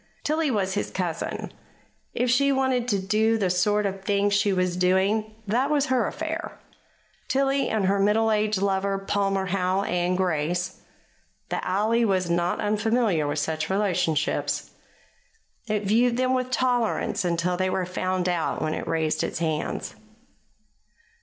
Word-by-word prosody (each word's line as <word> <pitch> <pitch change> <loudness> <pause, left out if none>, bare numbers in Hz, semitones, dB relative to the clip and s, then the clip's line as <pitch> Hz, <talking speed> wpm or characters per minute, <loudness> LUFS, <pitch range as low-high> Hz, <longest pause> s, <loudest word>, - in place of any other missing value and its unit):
Tillie 310 0 +1
was 195 -6 0
his 205 - -2
cousin. 175 -4 -3 0.6
If 245 0 0
she 280 +3 +3
wanted 260 -2 +1
to 205 -5 +2
do 215 +3 +2
the 190 -4 +1
sort 205 +3 +2
of 195 -1 -3
thing 205 0 +1
she 200 0 +2
was 180 -2 0
doing, 195 +4 +1
that 245 +7 +1
was 295 -2 +2
her 245 -4 +2
affair. 320 +1 -5 0.7
Tillie 275 0 +1
and 215 -3 0
her 200 +1 +2
middle 220 +3 +3
aged 210 -2 +1
lover, 195 0 0
Palmer 195 0 0
Howe 185 +1 0
and 180 -1 0
Grace 175 0 -1 0.7
the - - -2
alley 215 +5 +1
was 185 -5 +1
not 175 +1 0
unfamiliar 210 -5 +1
with 145 +1 -2
such 155 +1 -2
relationships. 180 -6 0 1.0
It 210 -1 -1
viewed 235 +4 +2
them 255 0 +1
with 255 -1 0
tolerance 245 -5 0
until 175 0 0
they 185 +1 0
were 185 0 -1
found 185 0 -2
out, 175 -2 -1
when 155 0 -1
it - - -5
raised 155 -1 0
its - - -3
hands. 160 -3 -2
200 Hz, 150 wpm, -25 LUFS, 180-225 Hz, 1.0 s, she